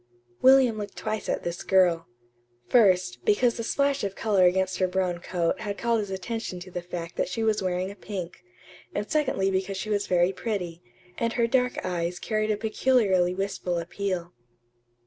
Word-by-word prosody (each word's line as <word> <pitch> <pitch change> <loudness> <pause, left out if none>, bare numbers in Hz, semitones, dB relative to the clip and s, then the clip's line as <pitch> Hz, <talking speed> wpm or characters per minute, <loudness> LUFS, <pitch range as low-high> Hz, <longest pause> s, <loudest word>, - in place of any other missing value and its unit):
William 260 -4 +6
looked 205 -2 -6
twice 215 -1 -3
at - - -1
this 175 0 -4
girl. 180 -3 +3 0.6
First, 185 - +3
because 235 +3 +3
the 230 - -3
splash 280 +2 +1
of 195 -1 -2
color 200 -4 +3
against 185 +1 +2
her 185 - +3
brown 180 -1 -1
coat 175 0 -1
had 205 -1 -4
called 235 -1 +1
his 205 -2 -3
attention 190 0 -4
to 185 +1 -10
the 175 - -4
fact 175 -1 -7
that - - +1
she 225 +5 -2
was 215 -2 +2
wearing 185 +1 -1
a - - -11
pink; 190 -4 -6 0.6
and - - -2
secondly 265 -11 +1
because 190 +1 -1
she 215 +3 -4
was 205 -1 0
very 180 +1 +3
pretty, 180 -6 -4 0.4
and 230 0 0
her 235 - +2
dark 250 +1 0
eyes 175 -1 -2
carried 215 +1 -1
a 210 - +1
peculiarly 210 -5 +2
wistful 190 -2 -2
appeal. 175 0 -3
195 Hz, 180 wpm, -26 LUFS, 180-220 Hz, 0.6 s, William